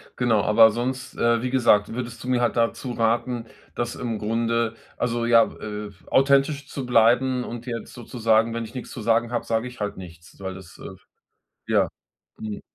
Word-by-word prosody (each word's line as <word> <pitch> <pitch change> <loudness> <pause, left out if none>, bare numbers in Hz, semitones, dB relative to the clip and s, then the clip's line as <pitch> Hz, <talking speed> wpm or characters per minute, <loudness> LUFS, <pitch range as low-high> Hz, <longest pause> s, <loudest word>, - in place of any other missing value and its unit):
Genau, 115 -4 +2
aber 110 +1 +7
sonst, 125 +4 -3
äh, 115 0 +2
wie 125 - -2
gesagt, 115 -5 +3
würdest 120 -1 -6
du - - -7
mir 130 -1 +2
halt 120 - +1
dazu 120 +2 0
raten, 115 +1 0 0.3
dass 120 0 -3
im 115 -3 -3
Grunde 115 +1 0 0.2
also, 120 -1 -1
ja, 115 -1 +6 0.2
äh, 105 -1 -5 0.2
authentisch 140 +1 +3
zu 135 -3 -5
bleiben 125 +2 +3
und 120 0 -7
jetzt 115 -3 -6
sozusagen, 115 -2 +1
wenn 115 0 -3
ich 115 - -10
nix 125 - -6
zu 120 - -7
sagen 115 +2 +2
habe, 120 - -1
sage 115 +2 -1
ich 125 - -11
halt 105 -1 -3
nichts? 85 -3 -12
Weil 95 -1 -5
das, 95 -2 -12
äh, - - -11
f - - -20 0.6
ja, - - +2 0.5
hm. 105 -1 -5
115 Hz, 190 wpm, -24 LUFS, 110-125 Hz, 0.6 s, aber